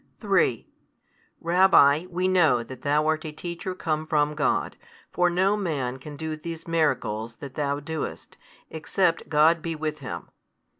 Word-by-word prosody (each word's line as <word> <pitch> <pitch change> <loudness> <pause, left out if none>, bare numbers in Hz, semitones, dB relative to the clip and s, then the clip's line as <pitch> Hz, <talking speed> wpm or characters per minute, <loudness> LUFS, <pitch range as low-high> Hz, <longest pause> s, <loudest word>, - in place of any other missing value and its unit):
|167 - - -35
3, 195 - +1 0.7
Rabbi, 170 -3 +5
we 180 +2 -1
know 160 -10 +3
that 130 +2 -10
Thou 150 +2 +1
art 155 0 0
a 155 - -5
Teacher 170 +3 -6
come 155 -3 -2
from 150 -2 +1
God; 150 -1 0 0.4
for 180 0 +2
no 190 +4 +2
man 145 -11 -2
can 145 +2 -9
do 160 +1 -4
these 165 +1 -8
miracles 115 -9 -1
that 135 +1 -9
Thou 145 -1 -1
doest, 160 +1 -6 0.4
except 165 +2 0
God 160 +2 +4
be 165 0 -3
with 155 0 -4
him. 130 - -7
155 Hz, 155 wpm, -25 LUFS, 145-170 Hz, 0.7 s, Rabbi